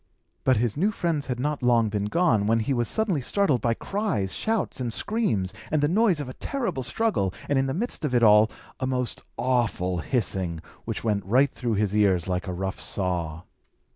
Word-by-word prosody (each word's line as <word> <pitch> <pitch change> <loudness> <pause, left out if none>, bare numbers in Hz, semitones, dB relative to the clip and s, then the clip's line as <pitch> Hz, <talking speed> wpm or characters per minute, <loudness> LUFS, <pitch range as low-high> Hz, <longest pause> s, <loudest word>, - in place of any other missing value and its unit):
But 130 -3 +4
his 115 -1 0
new 190 +8 +2
friends 170 -8 -1
had 125 -2 -3
not 145 +2 -1
long 120 -3 +3
been 100 -1 -1
gone, 110 - +2
when 115 +1 +3
he 135 +5 0
was 120 -2 0
suddenly 200 -10 +1
startled 145 - +1
by 115 0 +1
cries, 160 - -2
shouts, 220 -10 -1
and 120 -2 -2
screams, 115 - -1 0.2
and 155 - +1
the 145 - +3
noise 190 -1 +3
of 145 - -4
a 130 - -7
terrible 225 - -2
struggle, 130 - 0 0.2
and 140 -2 +2
in 135 - +1
the 135 - -1
midst 230 -1 -3
of 135 -4 0
it 120 - +3
all, 105 0 +7 0.3
a 130 - -1
most 125 -2 -1 0.2
awful 115 -8 0
hissing, 95 - -1 0.3
which - - -4
went 105 -3 0
right 130 +7 +3
through 120 -4 -2
his 105 0 0
ears 95 -5 +3
like 90 +1 -2
a - - -2
rough 95 +1 -4
saw. 85 -4 -2
120 Hz, 200 wpm, -26 LUFS, 100-150 Hz, 0.3 s, all